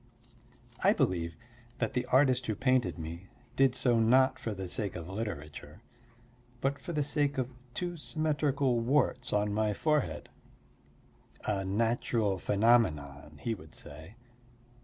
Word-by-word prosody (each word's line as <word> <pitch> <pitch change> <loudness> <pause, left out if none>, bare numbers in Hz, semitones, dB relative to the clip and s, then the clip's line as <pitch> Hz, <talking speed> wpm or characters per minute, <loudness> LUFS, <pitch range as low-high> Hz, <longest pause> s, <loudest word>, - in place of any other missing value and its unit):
I - - +6
believe 85 -2 0 0.4
that 115 - -1
the 125 0 -1
artist 130 -1 +3
who 110 - 0
painted 130 -7 +1
me 85 +3 -7 0.3
did 135 -2 +4
so 120 -3 +3
not 130 +4 +4
for 115 - -3
the 95 -2 -5
sake 100 +2 -3
of 85 -2 -6
literature, 90 -3 -6 0.8
but 135 +2 -1
for 175 - -6
the 150 -3 0
sake 145 -1 0
of 130 0 -2 0.2
two 175 -1 -3
symmetrical 145 -5 0
warts 125 0 +1
on 105 0 +1
my 105 0 +1
forehead, 150 +1 0 1.2
a 100 -2 0
natural 110 0 0
phenomenon, 80 - +1
he 115 - 0
would 80 -7 -11
say. 80 +8 -8
115 Hz, 135 wpm, -31 LUFS, 95-130 Hz, 1.2 s, I